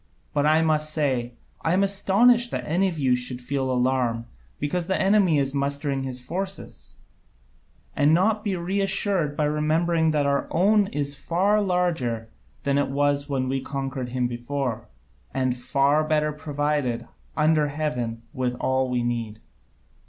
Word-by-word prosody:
But 145 0 +2
I 155 +1 +4
must 155 -1 +1
say 130 -6 -1 0.3
I 165 - +1
am 190 +2 +3
astonished 215 +5 +3
that - - -4
any 180 +5 +1
of 175 -3 -4
you 130 -4 +2
should 125 0 -2
feel 135 +1 -2
alarm 125 -2 0 0.3
because 165 +4 -2
the 190 - 0
enemy 195 -5 +4
is 135 -1 0
mustering 140 0 -1
his 130 -1 -4
forces, 190 +9 -6 1.0
and 145 +1 +4
not 210 +6 +2
be 200 -3 -1
reassured 190 -3 0
by 150 - +1
remembering 160 +2 +1
that 150 -2 +1
our 140 0 +1
own 200 +4 +3
is 145 -4 -3
far 190 +8 +1
larger 160 - -1 0.3
than 140 0 +1
it 145 - 0
was 145 +1 +1
when 130 -2 -1
we 135 +1 -1
conquered 135 -2 -4
him 125 0 -1
before, 120 -1 -3 0.5
and 130 -1 +1
far 140 +4 +2
better 150 0 +1
provided, 145 -5 -2 0.3
under 155 -1 +3
heaven, 125 -6 -3
with 125 -1 -1
all 130 +1 0
we 125 -1 0
need. 115 -3 -3
145 Hz, 150 wpm, -24 LUFS, 130-170 Hz, 1.0 s, I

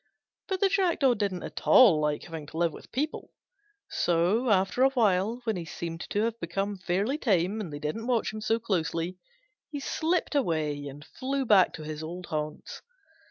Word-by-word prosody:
But 380 -1 -2
the 395 - +4
Jackdaw 340 -9 +3
didn't 200 -5 -2
at - - -7
all 195 -12 +7
like 150 -1 0
having 160 -3 -7
to 160 - -9
live 170 -2 +1
with - - -13
people; 300 +5 -3 0.6
so, 180 +9 +1
after 195 +4 +2
a 265 - +6
while, 225 -2 +1
when 220 -4 -1
he 175 - -4
seemed 165 +1 -6
to 210 - 0
have 230 0 -2
become 195 +4 -2
fairly 200 - 0
tame 200 - +1
and 180 -7 -6
they 145 - -5
didn't 155 +11 -4
watch 235 -4 +1
him 215 - -6
so 225 +1 +1
closely, 180 -4 -2 0.5
he 290 - -5
slipped 325 +5 -1
away 155 - 0
and 145 +2 -10
flew 270 +1 -3
back 205 -5 +5
to 155 - -7
his 155 0 -5
old 175 +3 -6
haunts. 155 -1 -5
195 Hz, 185 wpm, -28 LUFS, 165-240 Hz, 0.6 s, all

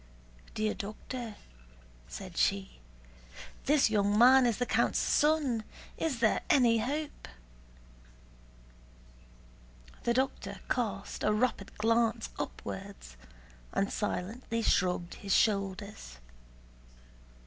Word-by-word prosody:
"Dear 215 0 0
doctor," 220 +2 -6 0.7
said 65 0 -8
she, 65 +1 0 0.9
"this 285 -5 +4
young 205 -1 +2
man 255 +2 +7
is 230 - 0
the 245 - 0
count's - - +1
son. 290 -7 +2 0.3
Is 275 -8 -2
there 220 - +3
any 235 -5 +5
hope?" 290 +6 -4 2.7
The 235 - 0
doctor 265 +1 -1
cast 200 -5 -2
a - - +3
rapid 215 -2 -1
glance 225 - +1
upwards - - -7 0.6
and 195 - 0
silently 225 +3 -3
shrugged 180 -3 +1
his 195 -1 +1
shoulders. 200 - -1
220 Hz, 95 wpm, -31 LUFS, 195-245 Hz, 2.7 s, man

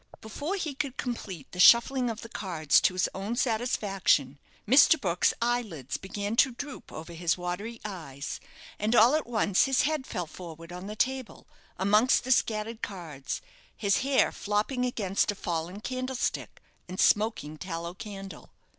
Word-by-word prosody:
Before 290 - -4
he 320 -7 -3
could 270 -1 -4
complete 195 - -5
the 180 - -9
shuffling 245 +5 +6
of 225 -1 -5
the - - -8
cards 170 -9 +2
to - - +3
his 185 - +2
own 200 +5 -3
satisfaction, 205 - +1 0.3
Mr. 285 +6 +7
Brook's 180 -5 +2
eyelids 220 - -2
began 205 +2 -4
to 260 0 +5
droop 285 +3 -8
over 165 +2 -8
his 170 +1 0
watery 180 +6 -4
eyes, 155 -8 -6 0.4
and 215 +3 +1
all 235 +4 +7
at 310 -4 0
once 215 -5 +2
his 270 -1 +2
head 300 -2 -1
fell 180 - -3
forward 165 0 -10
on 180 +2 -7
the 210 - -6
table, 260 +1 -2 0.3
amongst 210 +7 +4
the 260 - -2
scattered 220 -1 +1
cards, 160 -8 -5 0.4
his 200 -2 +2
hair 270 +1 +2
flopping 215 +5 -1
against 205 -6 0
a - - -8
fallen 175 +2 -4
candlestick 255 +1 -3 0.3
and 185 - -6
smoking 210 -8 +2
tallow 170 -2 -5
candle. 195 -1 -9
210 Hz, 155 wpm, -28 LUFS, 180-245 Hz, 0.4 s, Mr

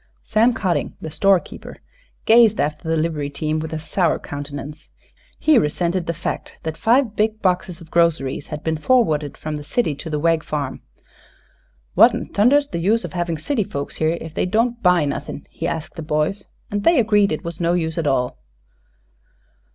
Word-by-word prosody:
Sam 225 +3 +3
Cotting, 185 -6 -1
the 160 - -7
store 195 +4 +4
keeper, - - -11 0.5
gazed 225 -1 +6
after 150 +2 -2
the 165 - +1
livery 155 -3 -1
team 155 +2 -2
with 160 +1 -5
a 160 - -2
sour 160 +2 0
countenance, 145 +1 -7 0.5
he 310 -6 +4
resented 170 +3 -1
the 170 - 0
fact - - -5
that 160 -1 -3
five 230 - +2
big 215 0 0
boxes 180 -1 0
of 165 - -14
groceries 160 -5 +1
had 150 -1 -6
been 160 -1 -1
forwarded 155 - +2
from 155 -1 -4
the 145 - -7
city 160 - 0
to 150 +3 -8
the 150 - -1
Wegg 165 +1 +2
farm. 150 -2 -4 1.1
"What'n - - +4
thunder's 280 +7 +4
the 170 - -3
use 215 +7 +2
havin' 175 -2 -3
city 225 - -1
folks 140 -6 -6
here, 160 +2 +1
ef 160 -1 -8
they 185 - 0
don't 235 +4 0
buy 180 -4 +4
nothin'?" 140 0 -5
he 165 - -4
asked 160 -2 -4
the 165 - -7
boys; 155 +5 -1 0.3
and 205 0 -2
they 335 -4 +5
agreed 210 -3 +3
it 155 - -3
was 170 0 -6
no 170 0 +2
use 165 -1 -1
at 160 - -1
all. 125 - 0
165 Hz, 180 wpm, -21 LUFS, 155-205 Hz, 1.1 s, gazed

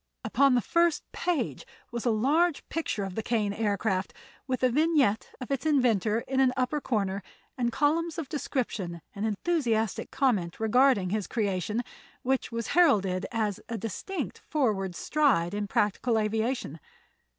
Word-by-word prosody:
Upon 275 -2 +3
the 245 - +3
first 340 +5 +2
page 350 -4 -1 0.3
was 235 +1 -3
a - - +5
large 290 +9 +2
picture 310 -10 -2
of 195 -1 -4
the 220 - -2
Kane 215 -3 0
Aircraft, 200 -2 -1 0.3
with 255 -1 -2
a 255 - +5
vignette 290 -6 +2
of 255 +1 -7
its 275 - -1
inventor 235 - +2
in 265 +2 -2
an 260 -1 +4
upper 260 +4 0
corner 200 -6 -1 0.3
and 240 -2 0
columns 315 +5 +1
of 325 -4 -3
description 215 - -3
and 210 +2 -2
enthusiastic 225 - 0
comment 205 -11 0
regarding 220 -4 +3
his 210 -2 -1
creation, 210 +1 -1 0.4
which 265 0 0
was 230 -1 -3
heralded 195 - +3
as 215 -4 -1
a 230 - -2
distinct 225 - -4
forward 210 - -1
stride 235 - +2
in 205 0 -2
practical 210 +4 +1
aviation. 220 - -1
230 Hz, 150 wpm, -28 LUFS, 205-275 Hz, 0.4 s, a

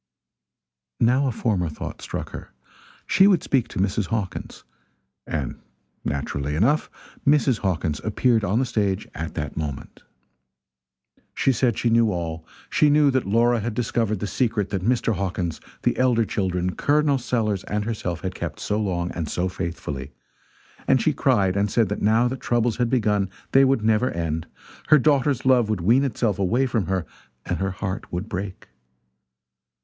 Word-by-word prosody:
Now 130 +4 +3
a - - +1
former 100 -7 0
thought 75 - -7
struck - - -5
her - - -8 0.6
she 190 - +5
would 190 -4 +3
speak 125 -4 +1
to - - -9
Mrs. 95 +1 0
Hawkins. 105 -3 -4 0.6
And 75 -6 -3 0.4
naturally 70 0 -2
enough 125 - +2 0.3
Mrs. 140 -5 +3
Hawkins 80 -6 -1
appeared 110 +1 +2
on 100 +2 +1
the 130 - +2
stage 105 -4 -1
at 80 +1 -5
that 75 - -4
moment. 75 -4 -5 1.3
She 135 - +3
said 120 -2 +1
she 120 - +1
knew 115 -1 +4
all 80 -3 -4 0.2
she 150 - +3
knew 145 -1 +5
that 130 -6 0
Laura 120 +3 +3
had 110 +1 -3
discovered 115 -2 0
the - - -1
secret 110 -2 0
that 95 -3 -1
Mr. 115 +2 +1
Hawkins, 90 -4 -3 0.2
the - - +2
elder 125 -3 +3
children, 90 -3 -1
Col. 145 -1 +2
Sellers 110 -6 -1
and 105 0 -2
herself 90 -7 -3
had 95 -1 -3
kept 80 -4 -5
so 105 0 -1
long 90 -4 -1
and 80 -4 -4
so 90 +1 -1
faithfully; 75 -7 -5 0.7
and 130 - +4
she 150 - +2
cried 100 -11 +2
and 100 +1 +1
said 110 -1 +2
that 105 - -3
now 110 +4 +3
that 130 +1 -4
troubles 120 -1 +1
had 120 -1 +1
begun 105 -6 +1 0.2
they 135 - +6
would 135 -4 +2
never 110 +3 +3
end; 80 -1 -3 0.4
her 155 - +7
daughter's 140 -2 +2
love 125 -4 +4
would 110 -5 -1
wean 120 +10 +4
itself 115 -6 0
away 115 +8 +2
from 115 -6 -1
her 95 -3 -1 0.4
and - - -2
her 95 0 0
heart 95 +1 -5
would 90 +4 -3
break. 95 -1 -6
105 Hz, 165 wpm, -24 LUFS, 90-125 Hz, 1.3 s, her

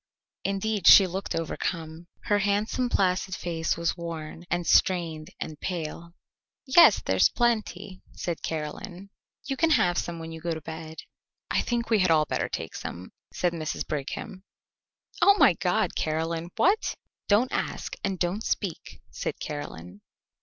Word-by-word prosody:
Indeed, 200 0 -1
she 195 - +10
looked 190 +2 -4
overcome. 165 0 -4 0.2
Her 205 0 +2
handsome 205 +5 0
placid 185 -3 +1
face 165 -2 -2
was 170 0 0
worn 165 -1 -7
and 175 0 -1
strained 165 -5 +2
and 155 -1 -6
pale. 170 -1 -5 0.5
"Yes, 285 +6 +7
there's - - +4
plenty," 220 -5 -1
said 170 -2 -4
Caroline; 175 +5 -5 0.3
"you 270 0 -2
can 325 +5 +2
have 175 - +3
some 170 -1 -4
when 165 0 -7
you 160 0 -8
go 170 -1 -2
to 160 - -7
bed." 160 +1 -8 0.5
"I - - +2
think 235 -1 -2
we 220 - +5
had 185 -2 +3
all 155 -2 +4
better - - -2
take - - -5
some," 90 +2 -7 0.2
said 175 -1 0
Mrs. 155 -2 -3
Brigham. 185 +7 -5 0.8
"Oh, 400 - +7
my - - +6
God, - - 0
Caroline, 165 +2 -2
what 400 +5 +2 0.2
" - - -66
"Don't 220 +5 +4
ask - - -3
and 195 -2 -1
don't 180 +5 -1
speak," 190 -6 -3
said - - -4
Caroline. 95 - -7
175 Hz, 155 wpm, -27 LUFS, 160-200 Hz, 0.8 s, she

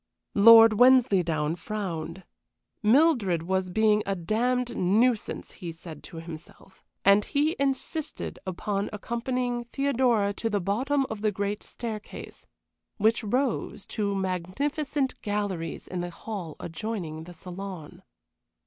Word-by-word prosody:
Lord 225 0 +8
Wensleydown 185 -12 +4
frowned. 180 -2 -5 0.6
Mildred 225 - +3
was 190 +1 -1
being 215 +2 +3
a 195 - 0
damned 240 +7 0
nuisance, 220 +5 +1
he 175 -4 -7
said 165 -2 -10
to 165 - -10
himself, 165 +3 -11 0.2
and 200 +1 +6
he 300 +4 +1
insisted 280 +3 -3
upon 195 +2 -2
accompanying 240 +3 -2
Theodora 240 -6 +1
to 225 +2 -2
the 205 -2 0
bottom 260 +9 0
of 220 -2 -5
the 215 -1 +2
great 205 +1 -2
staircase, 220 -3 -8 0.5
which 225 +3 +2
rose 245 -2 -1
to 200 -2 -1
magnificent 265 - -2
galleries 200 -6 -3
in 180 -1 -4
the 175 - -4
hall 175 -3 -7
adjoining 165 -3 -5
the 175 - -10
saloon. 180 -1 -8
205 Hz, 120 wpm, -27 LUFS, 180-240 Hz, 0.6 s, Lord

